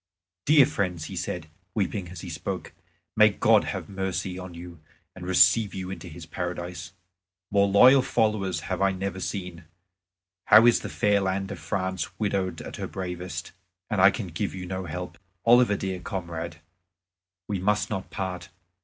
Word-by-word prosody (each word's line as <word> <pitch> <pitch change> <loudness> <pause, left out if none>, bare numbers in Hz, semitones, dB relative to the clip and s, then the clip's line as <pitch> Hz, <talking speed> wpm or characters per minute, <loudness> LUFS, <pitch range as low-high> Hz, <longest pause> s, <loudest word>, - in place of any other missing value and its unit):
"Dear 150 -2 +7
friends," 90 - -2
he - - -7
said, 85 -3 -4 0.3
weeping 100 -3 -1
as 90 - -9
he 90 - -7
spoke, 75 -2 -5 0.4
"may - - +7
God - - +3
have - - -4
mercy 95 -1 -3
on 90 -2 -8
you 85 -1 -10 0.4
and 90 -1 -8
receive 100 +3 +4
you 95 -1 -5
into 90 -2 -7
His 85 0 -9
Paradise! 90 0 -5 0.6
More 100 0 +4
loyal 125 +7 +7
followers 105 -9 0
have 95 +2 -3
I 100 0 +3
never 95 0 -4
seen. 90 -3 -5 0.8
How 110 +2 +8
is 120 - +6
the - - -6
fair 105 -1 +2
land 95 +1 -1
of 95 - -6
France 95 +1 -3
widowed 95 -5 -1
of - - -8
her - - -4
bravest, 90 -3 -5 0.4
and 105 -3 +2
I 100 - +9
can 95 -1 -4
give 95 +4 -3
you 90 -1 -6
no 95 0 -4
help. 90 +1 -6 0.3
Oliver, 120 -3 +5
dear 95 -2 -3
comrade, 85 -4 -5 0.9
we 100 -2 -2
must 105 +4 +1
not 95 -3 -3
part. 95 -2 -5
95 Hz, 165 wpm, -26 LUFS, 90-100 Hz, 0.9 s, I